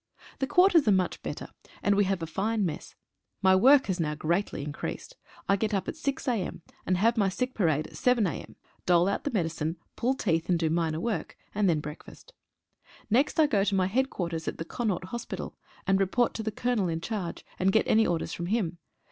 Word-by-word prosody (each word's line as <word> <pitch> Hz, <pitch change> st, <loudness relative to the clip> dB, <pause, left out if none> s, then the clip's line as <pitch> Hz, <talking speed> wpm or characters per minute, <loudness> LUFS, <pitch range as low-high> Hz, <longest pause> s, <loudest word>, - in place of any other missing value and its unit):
The 270 Hz, -, 0 dB
quarters 360 Hz, -, +5 dB
are -, -, +6 dB
much 185 Hz, -2 st, +1 dB
better, -, -, -6 dB, 0.3 s
and 205 Hz, -, +4 dB
we 200 Hz, 0 st, +3 dB
have 190 Hz, -3 st, -1 dB
a -, -, -1 dB
fine 205 Hz, +6 st, -1 dB
mess. 155 Hz, -4 st, -5 dB, 0.5 s
My 190 Hz, 0 st, +6 dB
work 265 Hz, +8 st, +6 dB
has 190 Hz, -2 st, -2 dB
now 150 Hz, -2 st, -1 dB
greatly 170 Hz, 0 st, -1 dB
increased. 150 Hz, -, -6 dB, 0.3 s
I 195 Hz, -, +4 dB
get 210 Hz, +1 st, -1 dB
up 195 Hz, -, -2 dB
at -, -, -3 dB
6 280 Hz, -3 st, -3 dB
a.m., 210 Hz, -8 st, -2 dB, 0.2 s
and 185 Hz, -, +2 dB
have 230 Hz, +5 st, +3 dB
my 200 Hz, -3 st, +3 dB
sick 250 Hz, +7 st, -2 dB
parade 155 Hz, -6 st, +1 dB
at -, -, -12 dB
7 250 Hz, -4 st, +3 dB
a.m., 175 Hz, -, -5 dB, 0.3 s
dole 175 Hz, 0 st, +5 dB
out 200 Hz, -, -1 dB
the -, -, +1 dB
medicine, 165 Hz, -5 st, -1 dB, 0.2 s
pull 255 Hz, +3 st, +1 dB
teeth, 165 Hz, -9 st, 0 dB
and 175 Hz, -, +4 dB
do 165 Hz, -1 st, 0 dB
minor 160 Hz, -1 st, 0 dB
work, 210 Hz, -3 st, -3 dB, 0.2 s
and 205 Hz, -2 st, +2 dB
then 155 Hz, -3 st, +2 dB
break 150 Hz, +1 st, -8 dB
fast. -, -, -15 dB, 0.8 s
Next 270 Hz, +8 st, +2 dB
I 315 Hz, -, +7 dB
go 210 Hz, -9 st, +2 dB
to 200 Hz, 0 st, +1 dB
my 185 Hz, -1 st, +3 dB
headquarters 185 Hz, -7 st, -1 dB
at -, -, -3 dB
the 165 Hz, -, -5 dB
Connaught 210 Hz, -3 st, -2 dB
Hospital, 235 Hz, +2 st, -5 dB, 0.3 s
and 195 Hz, 0 st, +3 dB
report 195 Hz, +5 st, +2 dB
to -, -, -4 dB
the 220 Hz, -, -2 dB
Colonel 235 Hz, -3 st, 0 dB
in 165 Hz, -1 st, -2 dB
charge, 180 Hz, -1 st, -4 dB
and 190 Hz, +1 st, +3 dB
get 220 Hz, -, +2 dB
any 220 Hz, 0 st, +4 dB
orders 170 Hz, -2 st, -1 dB
from 175 Hz, -, -4 dB
him. 180 Hz, -5 st, -1 dB
195 Hz, 215 wpm, -28 LUFS, 170-230 Hz, 0.8 s, I